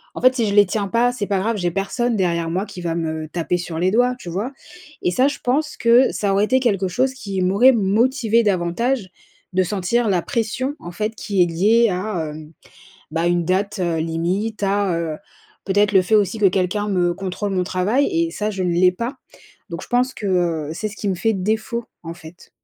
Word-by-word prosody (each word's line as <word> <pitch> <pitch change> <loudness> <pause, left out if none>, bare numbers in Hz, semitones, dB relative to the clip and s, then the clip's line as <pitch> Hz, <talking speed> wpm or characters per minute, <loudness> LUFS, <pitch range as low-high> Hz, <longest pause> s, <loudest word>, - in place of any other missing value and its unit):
en - - -6
fait, 255 +1 +5
si 235 -4 +1
je 200 - -1
les 205 -1 +7
tiens 200 +1 -2
pas, 235 +4 +2
c'est 230 -5 -4
pas 200 -2 0
grave, 220 +3 -1
j'ai 175 -3 0
personne 220 +6 -1
derrière 170 -4 0
moi 185 +5 -1
qui 195 -3 -9
va 170 -1 -2
me 160 -1 -3
taper 170 +2 -1
sur 170 -2 -5
les 180 +3 +1
doigts, 245 +3 +2
tu 175 - -9
vois? 205 +10 -3 0.5
Et 180 - +2
ça, 255 +9 +3
je 285 - -2
pense 300 +5 0
que 235 +3 +4
ça 200 -2 -1
aurait 200 +2 +3
été 260 +3 +2
quelque 200 -7 +1
chose 255 +9 0
qui 200 -7 -5
m'aurait 200 +8 +5
motivée 230 +2 +2
davantage 200 +3 0 0.4
de 185 - +3
sentir 205 +5 0
la 180 -3 +1
pression, 255 +3 -2
en 175 - -8
fait, 215 +5 -3
qui 195 -5 +1
est - - +2
liée 215 +8 +3
à, 180 -4 -3
hem, 155 +1 -10 0.6
bah, 165 +2 0
une 175 -1 +1
date, 200 +4 0
heu, 170 -2 0
limite, 175 +7 -2
à, 195 -3 +1
heu, 160 -2 -3 0.5
peut-être 205 +1 +2
le 190 -2 +5
fait 215 +4 +2
aussi 205 +1 +1
que 205 - +5
quelqu'un 190 +3 0
me 175 -3 +1
contrôle 195 +2 -4
mon 185 -1 0
travail 190 +10 +1
et 335 -1 0
ça 210 0 -2
je 195 -3 -3
ne 180 - 0
l'ai 180 +1 +4
pas. 235 +8 -5 0.5
Donc - - -6
je - - -12
pense 250 +1 +1
que, 210 - -6
heu, 170 -5 0
c'est 215 +5 -3
ce 205 - -9
qui 205 - -2
me 185 - 0
fait 225 +5 +1
défaut, 220 +4 -2 0.2
en 165 -1 -7
fait. 175 0 -14
200 Hz, 225 wpm, -21 LUFS, 180-230 Hz, 0.6 s, les